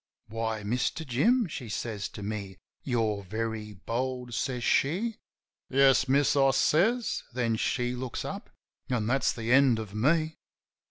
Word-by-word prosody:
"Why, 110 -1 -3
Mister 125 +9 -1
Jim," 220 - +3
she 125 -7 -7
says 105 -1 -3
to 105 - -9
me. 100 -2 -5 0.3
"You're 110 -5 0
very 110 +2 -4
bold," 125 +5 -3
says 125 0 -2
she. 195 - +1 0.5
"Yes, 135 0 +4
miss," 140 +2 +3
I 135 -1 +5
says. 195 - +2
Then 115 -3 +1
she 125 +2 -1
looks 125 -1 -4
up - - -6 0.2
— - - -43
an' 120 -4 0
that's 130 +4 +2
the 115 0 -3
end 130 -3 +5
of 110 -2 -6
me. 155 +8 +1
125 Hz, 150 wpm, -28 LUFS, 110-140 Hz, 0.5 s, I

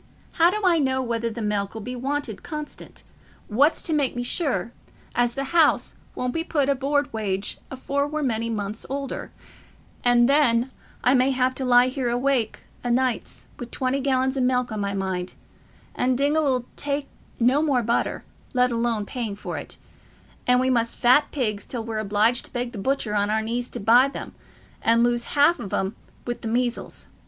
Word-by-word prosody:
How 340 0 +4
do 420 +4 -1
I 345 -3 +4
know 260 -2 +1
whether 235 -1 -1
the 230 0 -5
milk 205 -1 -1
'ull 220 - -5
be 250 +4 -5
wanted 270 -3 -3
constant? 300 -1 -7 0.4
What's 280 +9 +3
to 325 - -1
make 285 -5 +1
me 245 - -2
sure 245 - 0 0.4
as 240 -1 +1
the 275 - -1
house 330 -3 +4 0.2
won't 250 0 -2
be 330 - -1
put 290 -5 0
o' - - +5
board 280 0 0
wage 200 -3 -2
afore 280 +2 -1
we're 305 0 -2
many 230 -3 -1
months 210 -1 -4
older, 275 0 -4 0.7
and 240 -1 +5
then 260 -3 +3 0.3
I 250 - +5
may 255 0 +4
have 260 -1 +1
to 265 - -4
lie 250 +1 +5
awake 245 -2 0 0.2
o' 245 - -2
nights 235 - -1
wi' 245 - -5
twenty 260 +2 -1
gallons 265 -1 +1
o' 265 - 0
milk 250 -1 +1
on 215 - -3
my 200 0 -2
mind—and 190 +6 -4
Dingall 295 +2 +2
'ull 255 -2 +1
take 285 0 -2 0.3
no 255 +5 +4
more 275 -6 +2
butter, 235 +2 0 0.3
let 250 0 +3
alone 230 -2 0
paying 225 -3 -4
for 205 - -6
it; - - -9 0.7
and 250 0 +5
we 260 +1 +2
must 230 -2 0
fat 255 +5 +4
pigs 215 -8 -2
till 240 -3 -4
we're 220 -1 -3
obliged 215 +3 +1
to - - -15
beg 245 0 -2
the 220 - -7
butcher 250 -1 -1
on 205 0 +1
our 220 +1 +1
knees 240 +2 -2
to - - -6
buy 240 +6 +5
'em, - - -6 0.5
and 230 +1 +4
lose 240 0 +1
half 310 +5 +5
of 195 - -6
'em 195 +3 -1 0.3
wi' 240 - -1
the - - -4
measles. 240 +1 -2
245 Hz, 185 wpm, -24 LUFS, 225-275 Hz, 0.7 s, o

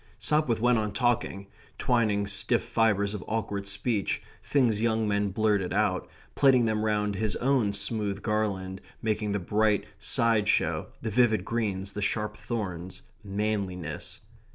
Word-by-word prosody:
Sopwith 120 +1 +1
went 120 0 +3
on 105 -1 -2
talking; 120 -4 0 0.3
twining 110 -4 +1
stiff 100 -1 +1
fibres 105 -3 +1
of 105 - -5
awkward 105 -3 -2
speech 100 +1 -1 0.2
things 120 -7 +2
young 110 -1 +1
men 100 0 +1
blurted 105 -2 +1
out 100 -2 0 0.2
plaiting 130 -4 +5
them 110 -1 0
round 105 -1 +1
his 100 0 -1
own 125 -5 +2
smooth 100 0 -1
garland, 100 -3 -1 0.2
making 110 -1 0
the 100 - +1
bright 105 +2 +1
side 115 -3 +2
show, - - +1 0.2
the 110 - -2
vivid 110 -4 +3
greens, 100 -4 -2
the 105 - -4
sharp 105 +1 -1
thorns, 95 -5 -5 0.2
manliness. 100 -5 -3
105 Hz, 140 wpm, -28 LUFS, 100-115 Hz, 0.3 s, plaiting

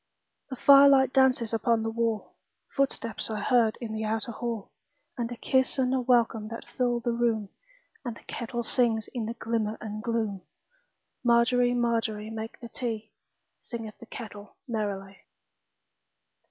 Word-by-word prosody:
The 260 - -4
firelight 275 0 +7
dances 255 -4 +3
upon 225 0 +2
the 225 - -1
wall, 225 -2 -1 0.4
Footsteps 260 -6 -1
are 215 -1 -2
heard 230 -1 +3
in 230 -3 -5
the 220 0 -3
outer 220 +2 -1
hall, 230 -3 -4 0.4
And 240 -2 -3
a 240 - -5
kiss 260 +3 +1
and 255 -1 +2
a 260 - +2
welcome 235 -3 +2
that 230 +1 -7
fill 245 -2 +1
the 240 - 0
room, 230 -3 0 0.5
And 240 -4 -4
the - - -15
kettle 235 0 -4
sings 225 -2 +1
in 235 -4 -2
the 230 - -4
glimmer 225 -2 -1
and 215 0 -5
gloom. 220 -4 -1 0.8
Margery, 245 +1 +4
Margery, 225 -3 0
make 225 0 -6
the 235 - -9
tea, 225 -3 -4 0.5
Singeth 225 -4 -7
the 235 - -12
kettle 210 -4 -9
merrily. 200 -4 -3
230 Hz, 150 wpm, -28 LUFS, 220-245 Hz, 0.8 s, firelight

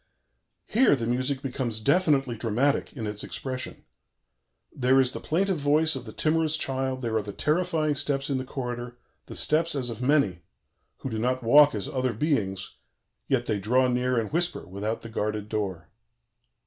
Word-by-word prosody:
Here 240 - +4
the 120 -4 -3
music 130 +3 -1
becomes 125 -4 -1
definitely 140 -2 +2
dramatic 120 +6 0
in 115 -6 -5
its 105 0 -3
expression: 130 -1 -6 0.9
"There 130 +1 +3
is 130 -1 +3
the - - -6
plaintive 185 +1 0
voice 150 +2 +4
of 130 -2 -6
the 110 - -8
timorous 160 +3 +1
child; 130 -2 -2
there 115 -2 -1
are - - +1
the 100 0 -7
terrifying 155 - 0
steps 140 -1 0
in 135 -2 -1
the - - -3
corridor, 120 -2 -5 0.3
the - - -8
steps 165 +1 +2
as 125 -3 -1
of 115 +1 -7
many, 125 - +2 0.6
who 135 - -4
do 110 - -2
not 125 +2 -1
walk 145 +3 +6
as 100 - -3
other 130 -2 -1
beings, 105 - -2 0.5
yet 130 -3 +1
they 105 -3 -1
draw 125 +6 +2
near 125 0 0
and 115 +3 -2
whisper 175 +1 -1
without 100 +5 -4
the 115 - -8
guarded 105 -1 -3
door." 95 -6 -3
130 Hz, 175 wpm, -26 LUFS, 115-145 Hz, 0.9 s, walk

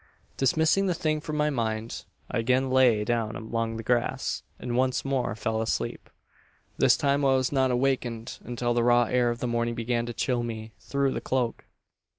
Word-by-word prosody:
"Dismissing 160 +8 +2
the 180 - +1
thing 155 -2 0
from 155 -1 -4
my 150 0 +2
mind, 115 -3 -3 0.3
I 125 - 0
again 130 +3 +1
lay 125 -5 +4
down 115 -1 -1
along 115 0 -3
the 115 - -5
grass; 120 +1 0 0.2
and 120 -1 -4
once 130 +1 +1
more 135 -5 -1
fell 110 0 -1
asleep. 115 - -3 0.7
"This - - +4
time 140 0 +1
I 135 -1 +4
was 130 -1 +1
not 135 -2 +2
awakened 125 -2 -1
until 120 0 -1
the 120 0 +2
raw 120 0 +5
air 120 +1 +2
of 120 0 -3
the - - -1
morning 120 0 -1
began 120 0 -1
to 120 - -4
chill 125 -2 0
me 110 -2 -6
through 140 -1 0
the - - -3
cloak. 125 -3 -1
120 Hz, 185 wpm, -27 LUFS, 115-135 Hz, 0.7 s, raw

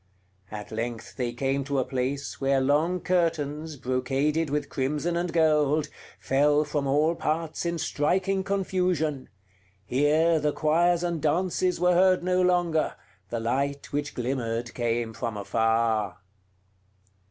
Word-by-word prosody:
At 105 0 -8
length 115 0 -5
they 125 -2 -2
came 135 +3 -1
to 140 -1 -1
a 130 - +1
place 130 +2 -3
where 135 0 +2
long 155 +7 +1
curtains, 160 -3 -1
brocaded 135 +5 0
with 150 +1 -1
crimson 150 +5 -1
and 175 0 -1
gold, 155 -2 +2 0.3
fell 145 +2 +3
from 145 -2 -2
all 150 +4 +3
parts 165 +1 -2
in 170 0 -1
striking 190 +6 0
confusion; 180 -7 -1 0.6
here 155 +6 +3
the 150 -1 0
choirs 170 +3 +2
and 170 -3 -2
dances 180 +3 +1
were 180 0 +4
heard 185 0 +4
no 185 0 +2
longer, 175 -3 +1 0.3
the 120 - -2
light 140 +6 -2
which 145 0 -2
glimmered 120 -2 -2
came 115 -1 -1
from 115 -2 -4
afar. 110 -1 +1
145 Hz, 130 wpm, -26 LUFS, 130-170 Hz, 0.6 s, were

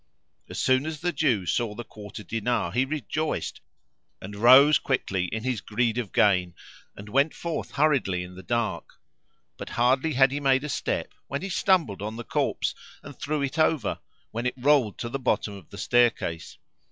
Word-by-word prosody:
As - - -7
soon 130 +3 +2
as 155 -2 -5
the 175 +1 -1
Jew 135 - +1
saw 110 +3 -1
the 120 - -6
quarter 105 0 -10
dinar 115 -2 -1
he 125 +7 +1
rejoiced 155 +2 -3 0.6
and 100 +2 -8
rose 130 +7 +7
quickly 95 -8 -1
in 110 +4 -4
his 125 -5 -1
greed 115 +2 0
of 110 -6 -4
gain 90 -4 +2 0.4
and 100 - -10
went 140 +8 +2
forth 170 -1 -4
hurriedly 135 -12 +2
in 90 0 -10
the 95 - -10
dark; 110 -3 -3 0.6
but - - -7
hardly 130 +6 +2
had 135 0 +4
he 145 - -2
made 135 -1 +2
a 150 - -4
step - - -2
when 140 +5 -4
he 195 - -4
stumbled 170 - +1
on 105 +2 -4
the 120 - -6
corpse - - -1 0.3
and - - -10
threw 150 -1 -1
it 140 +4 -3
over, 155 -3 +1 0.3
when 115 +3 -2
it 125 - -2
rolled 130 -5 +3
to 120 - -4
the 135 +4 -4
bottom 110 -4 0
of 95 -5 -12
the 100 - -11
staircase. 120 -8 +1
120 Hz, 185 wpm, -26 LUFS, 105-140 Hz, 0.6 s, rose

